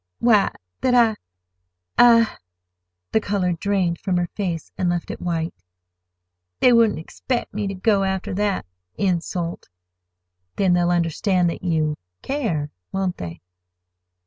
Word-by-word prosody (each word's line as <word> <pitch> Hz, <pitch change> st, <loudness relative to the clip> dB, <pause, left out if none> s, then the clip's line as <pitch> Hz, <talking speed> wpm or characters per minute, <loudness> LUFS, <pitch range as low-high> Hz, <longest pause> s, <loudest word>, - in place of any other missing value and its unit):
"Why, 220 Hz, -4 st, +4 dB, 0.3 s
that 250 Hz, -1 st, +3 dB
I—I—" 90 Hz, -, +2 dB, 0.7 s
The 220 Hz, -, +3 dB
color 195 Hz, -4 st, 0 dB
drained 180 Hz, -1 st, 0 dB
from 185 Hz, -3 st, 0 dB
her 175 Hz, 0 st, 0 dB
face 175 Hz, -6 st, -3 dB
and 180 Hz, -, 0 dB
left 175 Hz, -1 st, -2 dB
it -, -, -8 dB
white. 165 Hz, -1 st, -2 dB, 1.1 s
"They 250 Hz, -, +6 dB
wouldn't 230 Hz, -3 st, +4 dB
expect 240 Hz, +9 st, -4 dB
me 210 Hz, -1 st, -2 dB
to 195 Hz, -, -3 dB
go 200 Hz, +1 st, +2 dB
after 190 Hz, -1 st, -2 dB
that—insult." 175 Hz, -, -2 dB, 0.9 s
"Then 190 Hz, -3 st, +3 dB
they'll 175 Hz, 0 st, +3 dB
understand 175 Hz, +1 st, +1 dB
that -, -, -7 dB
you—care, 155 Hz, -, -2 dB, 0.2 s
won't 190 Hz, -2 st, -1 dB
they?" 85 Hz, -1 st, -7 dB
180 Hz, 120 wpm, -22 LUFS, 160-205 Hz, 1.1 s, They